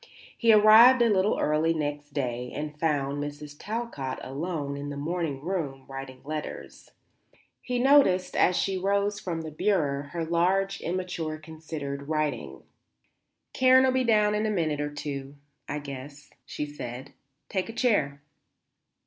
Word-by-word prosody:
He 230 -1 +4
arrived 220 +4 +8
a 230 - +3
little 195 +1 +2
early 155 +2 +2
next 145 -1 -3
day 125 -3 -3
and 150 0 -5
found 145 -3 0
Mrs. 145 0 -7
Talcott 210 - -4
alone 145 0 -4
in 145 0 -5
the 145 - -5
morning 160 -1 -2
room 150 -6 -3
writing 135 -1 -8
letters. 155 +1 -7 0.7
He 250 -1 -2
noticed, 245 -8 +4
as 180 - +3
she 190 -1 0
rose 200 +2 0
from 170 -5 -4
the 160 -1 -7
bureau, 145 -5 0
her 165 +3 -4
large, 190 +4 +1
immature, 170 -3 -3
considered 155 -3 -7
writing. 155 -2 -2 0.9
"Karen'll 260 0 +5
be 260 0 +1
down 210 -3 +3
in 210 +1 0
a - - 0
minute 160 -7 0
or 145 - -2
two, 140 -1 -6 0.3
I 150 - -2
guess," 140 0 -9 0.2
she 150 - -4
said. 135 -2 -8 0.3
"Take 190 +2 -2
a - - -3
chair." 155 - +1
155 Hz, 145 wpm, -27 LUFS, 145-195 Hz, 0.9 s, arrived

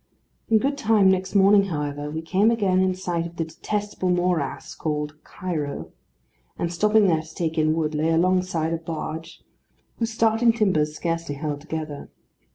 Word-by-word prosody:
In 225 - +5
good 280 +5 0
time 215 -5 +4
next 190 +1 -1
morning, 200 0 +6
however, 150 -4 -3
we 160 +2 -4
came 195 +6 +3
again 200 -5 +2
in 185 0 +2
sight 175 -2 -2
of 170 - -14
the 165 - -2
detestable 205 +3 -3
morass 175 -5 0
called 150 -1 -3
Cairo; 155 -6 -4 0.7
and 170 0 -2
stopping 210 +4 +4
there 165 -4 +3
to 160 0 -14
take 160 -2 -2
in 155 -1 +2
wood, 155 -1 -1
lay 155 +2 +1
alongside 175 -1 +1
a - - 0
barge, 160 0 -6 0.6
whose 230 -1 0
starting 225 +1 +3
timbers 160 -9 +1
scarcely 165 -3 -2
held 145 0 -4
together. 155 -2 -6
170 Hz, 165 wpm, -24 LUFS, 155-195 Hz, 0.7 s, morning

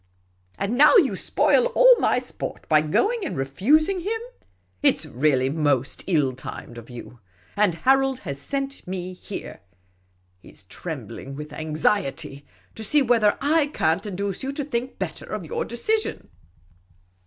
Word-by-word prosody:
And 210 +6 -2
now 300 +10 +7
you 345 - +5
spoil - - +2
all - - +8
my - - +2
sport - - -6
by 155 -1 +5
going 410 - +1
and 325 - -4
refusing 285 - +2
him! 430 +6 -2 0.6
It - - +4
's - - -8
really 130 0 +1
most 145 -3 0
ill 150 -8 +2
timed 120 -2 -8
of 115 - -14
you. 120 0 -10 0.4
And 200 -4 +2
Harold 265 +7 +2
has 140 0 -5
sent 275 - -4
me 185 0 -4
here 190 +2 -8 0.4
— 90 0 -41
he - - -15
's - - -15
trembling 135 0 -7
with 150 +1 -8
anxiety 155 -3 -2
— - - -34
to 220 - -7
see 290 +7 +3
whether 230 -4 +3
I 300 +1 +3
can't 160 - 0
induce 200 -1 -3
you 270 - -3
to 290 - -3
think 255 -2 -4
better - - -5
of - - -5
your 470 0 -3
decision." 435 - -2
200 Hz, 160 wpm, -24 LUFS, -, 0.6 s, all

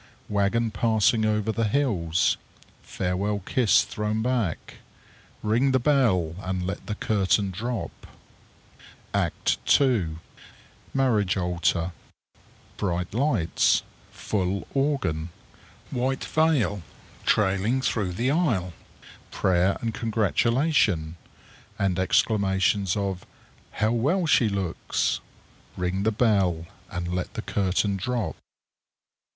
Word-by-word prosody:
Wagon 105 +3 +1
passing 110 0 +2
over 105 0 +1
the 115 0 0
hills. 95 - +1 0.5
Farewell 95 +3 -2
kiss 120 -5 +3
thrown 105 +1 -2
back. 120 -9 -2 0.7
Ring 120 +6 +2
the 130 - +4
bell 115 - +2
and 95 -2 -3
let 95 - -5
the 105 - -2
curtain 100 -2 +1
drop_. 115 +4 -3 1.2
ACT - - 0 0.2
II. 110 - +1 0.8
_Marriage 105 -8 +2
altar. 90 0 0 0.9
Bright 90 -2 -2
lights. 115 - +2 0.3
Full 95 -1 -2
organ. 135 - 0 0.6
White 130 +2 -1
veil 150 - +1 0.5
trailing 105 +4 +2
through 105 -7 -1
the 120 +8 0
aisle. 115 - +1 0.6
Prayer 95 0 +1
and 115 -1 -2
congratulation, 110 - +1 0.6
and 95 -3 0
exclamations 95 -1 +2
of 95 -2 -2 0.5
"How 110 +1 +1
well 145 +11 +1
she 125 -7 +4
looks!" 95 -4 -1 0.6
Ring 90 +2 -1
the 110 +2 +2
bell, 100 -7 +2 0.2
and 90 -1 -4
let 90 0 -3
the - - -4
curtain 100 +1 0
drop_. 120 +2 -2
105 Hz, 100 wpm, -25 LUFS, 90-120 Hz, 1.2 s, the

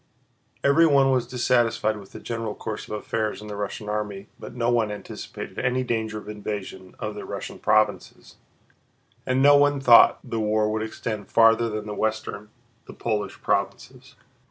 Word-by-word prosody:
Everyone 140 -2 +5
was 125 -2 +1
dissatisfied 120 -3 +1
with 100 -2 -13
the - - -9
general 115 -2 -4
course 110 - -6
of - - -5
affairs 110 0 -2
in 105 0 -10
the 105 - -5
Russian 105 +1 -5
army, 105 -1 -4
but - - -9
no 120 0 +1
one 115 -3 +1
anticipated 105 - -8
any 125 +1 0
danger 110 -3 -2
of 105 - -9
invasion 100 -3 -6
of 105 0 -4
the 105 - -7
Russian - - -7
provinces, 110 -1 0 0.9
and 130 +1 +2
no 145 0 +8
one 145 0 +4
thought 125 -3 +7
the 115 - -4
war 105 0 +1
would 110 0 -1
extend 110 -1 -5
farther 115 0 +4
than 105 -1 -4
the 105 - -5
western, 110 -1 -3 0.4
the - - -11
Polish, 105 -3 -3
provinces. - - -3
110 Hz, 165 wpm, -24 LUFS, 105-120 Hz, 0.9 s, no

